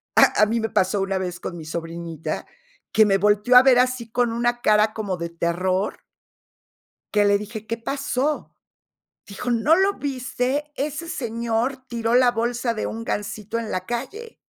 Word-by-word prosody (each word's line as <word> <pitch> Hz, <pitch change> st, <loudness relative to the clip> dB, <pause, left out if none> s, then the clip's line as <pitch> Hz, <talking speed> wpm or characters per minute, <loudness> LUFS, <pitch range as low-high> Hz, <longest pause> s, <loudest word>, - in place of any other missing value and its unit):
¡Ah!, -, -, +6 dB
a -, -, +7 dB
mí 230 Hz, +2 st, 0 dB
me 225 Hz, -1 st, -2 dB
pasó 190 Hz, +2 st, +1 dB
una 195 Hz, 0 st, -1 dB
vez 180 Hz, -1 st, -4 dB
con 175 Hz, -, -6 dB
mi 160 Hz, -, -8 dB
sobrinita, 165 Hz, 0 st, -5 dB, 0.5 s
que 220 Hz, 0 st, +5 dB
me 195 Hz, -1 st, +3 dB
volteó 210 Hz, +5 st, +3 dB
a 255 Hz, -, +9 dB
ver 255 Hz, -2 st, +6 dB
así, 250 Hz, -3 st, 0 dB
con 245 Hz, -1 st, +1 dB
una 240 Hz, +1 st, 0 dB
cara 215 Hz, 0 st, +3 dB
como 200 Hz, -4 st, -3 dB
de 170 Hz, 0 st, -4 dB
terror 180 Hz, +4 st, -1 dB, 1.1 s
que 205 Hz, -1 st, +3 dB
le 200 Hz, 0 st, +4 dB
dije: 210 Hz, +1 st, -7 dB
"¿Qué 230 Hz, -, -2 dB
pasó?", 275 Hz, +4 st, -2 dB, 0.7 s
dijo, 205 Hz, +5 st, -4 dB
"¿No 260 Hz, +8 st, +4 dB
lo 390 Hz, +2 st, +3 dB
viste? 270 Hz, +1 st, -2 dB
Ese 305 Hz, +4 st, -4 dB
señor 235 Hz, +2 st, -2 dB
tiró 235 Hz, -1 st, 0 dB
la 250 Hz, -1 st, +5 dB
bolsa 235 Hz, +1 st, -1 dB
de 215 Hz, -, -3 dB
un 225 Hz, +1 st, -5 dB
gansito 215 Hz, +1 st, -3 dB
en 225 Hz, -2 st, -5 dB
la 185 Hz, 0 st, -3 dB
calle". 400 Hz, -, -5 dB
230 Hz, 175 wpm, -23 LUFS, 200-250 Hz, 1.1 s, a